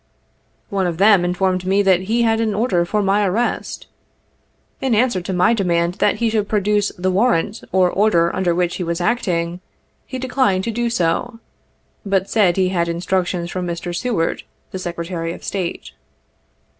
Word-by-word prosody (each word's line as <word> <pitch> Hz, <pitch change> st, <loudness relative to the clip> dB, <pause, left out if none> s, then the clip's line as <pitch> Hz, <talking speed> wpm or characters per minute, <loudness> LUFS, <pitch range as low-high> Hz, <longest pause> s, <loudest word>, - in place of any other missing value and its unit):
One 195 Hz, -2 st, 0 dB
of 170 Hz, -2 st, -3 dB
them 200 Hz, -1 st, +5 dB
informed 185 Hz, +1 st, 0 dB
me 195 Hz, +2 st, +2 dB
that 190 Hz, -2 st, +4 dB
he 235 Hz, +1 st, +2 dB
had 225 Hz, -1 st, +2 dB
an 215 Hz, -2 st, 0 dB
order 200 Hz, -6 st, +1 dB
for 210 Hz, +3 st, 0 dB
my 200 Hz, +2 st, +2 dB
arrest. 205 Hz, +5 st, -2 dB, 1.0 s
In 260 Hz, -4 st, +1 dB
answer 230 Hz, -4 st, +2 dB
to 180 Hz, -, -5 dB
my 185 Hz, +5 st, +3 dB
demand 175 Hz, -5 st, +1 dB
that 210 Hz, -, +3 dB
he 230 Hz, -2 st, 0 dB
should 210 Hz, -2 st, -1 dB
produce 205 Hz, 0 st, +1 dB
the 185 Hz, +1 st, 0 dB
warrant 210 Hz, 0 st, +1 dB
or 185 Hz, -1 st, +4 dB
order 175 Hz, -5 st, +2 dB
under 180 Hz, -2 st, +1 dB
which 175 Hz, 0 st, 0 dB
he 185 Hz, -, -3 dB
was 170 Hz, 0 st, -2 dB
acting, 175 Hz, -4 st, -1 dB, 0.5 s
he 260 Hz, -, -5 dB
declined 255 Hz, -7 st, +1 dB
to 230 Hz, -, -2 dB
do 240 Hz, +1 st, -1 dB
so, 230 Hz, +4 st, -1 dB, 0.6 s
but 195 Hz, -1 st, -1 dB
said 195 Hz, -6 st, +3 dB
he 185 Hz, -1 st, +2 dB
had 170 Hz, -2 st, 0 dB
instructions 175 Hz, 0 st, -1 dB
from 180 Hz, -1 st, -3 dB
Mr. 175 Hz, 0 st, -4 dB
Seward, 205 Hz, -6 st, -1 dB, 0.3 s
the 190 Hz, -, -5 dB
Secretary 170 Hz, -1 st, -4 dB
of -, -, -12 dB
State. 170 Hz, -, -4 dB
190 Hz, 170 wpm, -19 LUFS, 175-215 Hz, 1.0 s, them